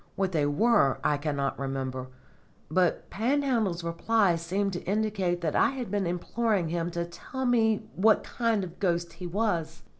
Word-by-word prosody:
What 195 -1 0
they 150 -4 +1
were 165 - +3
I 150 - +2
cannot 145 -2 -2
remember, 130 -1 -3 0.6
but 180 +1 +1
Panhandle's 230 -7 0
reply 180 +3 +2
seems 190 +4 -1
to 175 - -4
indicate 195 -3 0
that 160 -3 -1
I - - +4
had 255 -7 -5
been 200 -3 0
imploring 185 +1 0
him 170 0 -1
to 170 0 -3
tell 260 +10 -6
me 220 -3 +2
what 215 +3 +4
kind 230 -4 0
of 180 - -5
a - - -20
ghost 170 -2 0
he 180 - -7
was. 170 -5 -1
180 Hz, 170 wpm, -28 LUFS, 165-220 Hz, 0.6 s, I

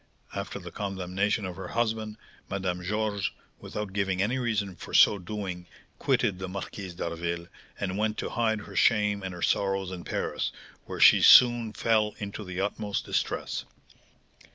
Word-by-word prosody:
After 100 0 -4
the 90 -3 -9
condemnation 95 +1 -1
of 90 -2 -6
her - - -6
husband, 110 -2 -1 0.3
Madame 95 -2 -2
Georges, 105 0 -1 0.3
without 105 -2 -5
giving 95 -2 0
any 115 +7 +1
reason 105 -6 -1
for - - -7
so 100 - +7
doing, 90 -2 -5 0.3
quitted 95 -2 +1
the 95 -1 -4
Marquise 95 -1 -6
d'Harville, 85 0 -3 0.3
and 95 0 -2
went 110 0 0
to - - -3
hide 110 -2 +1
her - - -11
shame 105 -2 +3
and 95 -1 -4
her 90 -1 -6
sorrows 95 -1 +1
in 90 -2 -6
Paris, - - -2 0.3
where - - -6
she - - +8
soon 120 -2 +7
fell 110 -1 +1
into 100 +1 -6
the 90 -1 -6
utmost 100 +1 -2
distress. - - -2
100 Hz, 155 wpm, -28 LUFS, 95-105 Hz, 0.3 s, she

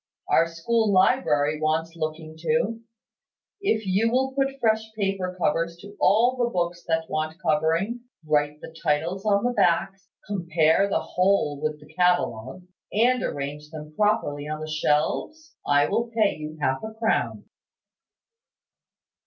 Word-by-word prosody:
Our 165 - +4
school 210 +7 0
library 155 - +2
wants 160 +1 0
looking 155 0 -5
to. 230 +5 0 0.8
If 220 - 0
you 195 +4 +2
will 265 +2 +1
put 270 0 -1
fresh 220 -2 +2 0.2
paper 195 -3 -1
covers 165 +1 0
to 205 0 -12
all 240 +5 +4
the 240 -1 +1
books 175 -3 -2
that 160 -1 0
want 155 +1 -3
covering, 165 +8 +1 0.3
write 150 0 0
the 160 - -10
titles 170 +7 -1
on 200 0 +3
the 245 - +1
backs, 185 -1 +1 0.2
compare 170 -1 +2
the - - +1
whole 180 -6 +1
with 155 -1 -2
the 150 +1 -17
catalogue, 180 -4 0 0.3
and 245 +4 +3
arrange 145 +2 -4
them 155 -1 -9
properly 150 -9 0
on 155 0 -4
the 155 - -5
shelves, 155 - -1
I 145 0 +4
will 235 +1 -1
pay 220 -3 +1
you 155 0 -7
half 130 -2 0
a 220 0 -7
crown." 220 0 -1
175 Hz, 145 wpm, -25 LUFS, 155-220 Hz, 0.8 s, Our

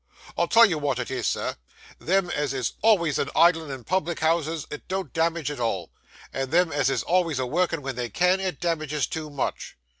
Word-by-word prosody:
I'll - - +1
tell 230 0 +7
you 170 -8 0
wot 140 -3 -1
it 125 0 -4
is, 130 - -1
sir; - - -2 0.4
them 185 -1 +1
as 145 -4 -1
is 130 -2 -2
always 180 -9 +3
a - - 0
idlin' 165 -2 +4
in 135 -3 -6
public 170 +2 -1
houses 160 -1 0
it 150 - -8
don't 190 -5 -3
damage 165 -2 0
at 145 - -7
all, 105 -7 -2 0.4
and 135 -1 -2
them 170 +2 +3
as 145 -2 +1
is - - 0
alvays 170 -4 +1
a 130 - 0
workin' 165 +2 0
wen 135 -1 -4
they 120 -1 -3
can, 180 - +2
it 190 -1 -3
damages 155 -4 -1
too 155 -1 -5
much. 145 -2 -4
160 Hz, 210 wpm, -25 LUFS, 135-175 Hz, 0.4 s, tell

